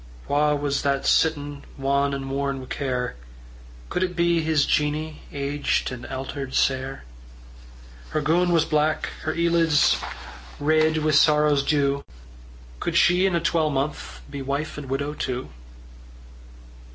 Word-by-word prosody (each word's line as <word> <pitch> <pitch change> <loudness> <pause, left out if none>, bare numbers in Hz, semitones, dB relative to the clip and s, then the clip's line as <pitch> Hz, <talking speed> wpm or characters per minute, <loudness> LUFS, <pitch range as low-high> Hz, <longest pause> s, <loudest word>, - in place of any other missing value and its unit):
Wha 150 +1 +2
was 145 -1 -1
that 140 -1 +1
was - - +2
sittin' 145 -3 +1
Wan 140 +1 +1
and 135 -1 -5
worn 140 0 -1
wi' 130 - -8
care? 125 - -3 0.7
Could 180 - -2
it 180 -1 -1
be 170 -1 +2
his 155 -2 +2
Jeannie 150 +1 -1
Aged 140 0 -1
and 125 -1 -7
alter'd 135 0 -5
sair? 130 - 0 1.1
Her 155 - -1
goon 175 +4 +2
was 165 -2 +3
black, 155 0 +1 0.2
her 155 - -1
eelids 170 -3 +3 0.6
Reid 155 +2 +3
wi' 155 - +2
sorrow's 150 -1 +4
dew: 140 -1 +1 0.8
Could - - -1
she 180 +2 +4
in 185 - 0
a - - +2
twalmonth 150 - -1
Be 140 - -7
wife 140 +3 -3
and 140 -3 -8
widow 140 +2 -2
too? 130 -3 -4
145 Hz, 140 wpm, -24 LUFS, 140-155 Hz, 1.1 s, sorrow's